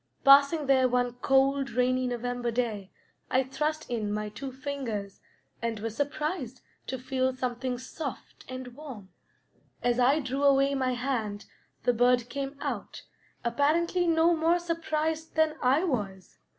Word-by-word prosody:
Passing 280 +3 +7
there 260 -2 +4
one 245 0 +1
cold, 270 0 +3
rainy 255 +1 +1
November 245 0 -2
day, 225 -5 -2 0.4
I 260 +1 +3
thrust 300 +4 -2
in 220 -4 -2
my 210 0 -2
two 265 +5 -7
fingers 255 -7 -5 0.4
and 230 -2 -2
was 225 0 -4
surprised 290 -2 -3 0.3
to 260 - -3
feel 260 0 -1
something 250 0 -2
soft 270 +2 -7
and 255 -1 -6
warm: 250 -7 -10 0.7
as 245 0 +2
I 265 +5 +4
drew 270 -1 -3
away 275 0 +4
my 260 -2 0
hand 235 -5 -2 0.4
the 245 - +3
bird 245 0 +3
came 275 0 -4
out, - - -4 0.4
apparently 330 +8 +2
no 330 +1 +4
more 330 +2 +3
surprised 320 -2 -2
than 315 -1 +3
I 265 +6 +3
was. 205 - -3
260 Hz, 140 wpm, -28 LUFS, 245-290 Hz, 0.7 s, Passing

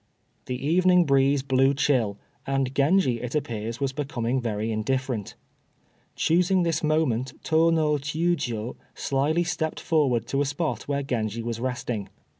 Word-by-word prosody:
The 125 -1 -2
evening 180 +1 +4
breeze 135 -1 +3
blew 135 0 +3
chill, 120 -8 +1 0.3
and 135 -1 0
Genji 140 -4 +2
it 125 +3 -4
appears 115 -5 -3
was 135 -1 -1
becoming 130 -3 -2
very 110 -1 -2
indifferent. 120 0 -2 0.8
Choosing 180 +3 +2
this 165 -2 0
moment 135 -5 +1
Tô 160 +1 +3
no 155 -2 +2
Chiûjiô 145 -6 -2 0.2
slyly 145 +5 +1
stepped 165 -2 -2
forth 145 -8 +1
to 135 - -2
the 145 - +2
spot 145 -5 -3
where 140 0 -1
Genji 115 -4 -2
was 115 -1 -3
resting. 120 -4 -3
135 Hz, 140 wpm, -25 LUFS, 120-155 Hz, 0.8 s, evening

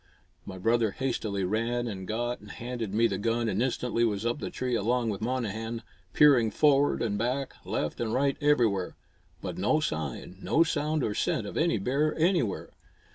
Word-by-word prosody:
My 95 - -7
brother 115 +3 +2
hastily 105 -4 -2
ran 115 +5 0
and 95 -4 -5
got 120 +2 -2
and 105 - -14
handed 120 -3 -5
me 110 +3 +3
the 100 -4 0
gun 115 +2 0
and 105 0 0
instantly 125 -2 0
was 110 -1 0
up 120 +4 0
the - - -4
tree 125 -1 -3
along 115 +1 +1
with 100 - -5
Monnehan, 115 -1 -3 0.3
peering 135 -7 +6
forward 145 +1 +3
and 105 -3 -1
back, 130 +4 -1
left - - -2
and 115 -2 -1
right, 140 +3 +2
everywhere. 120 -11 +2 0.5
But - - -4
no 155 - +3
sign, 80 - -4
no 165 - +3
sound 155 -2 0
or 105 - 0
scent 105 - 0
of - - -7
any 165 -5 +2
bear 140 +9 0
anywhere. 165 - +1
115 Hz, 180 wpm, -28 LUFS, 105-130 Hz, 0.5 s, peering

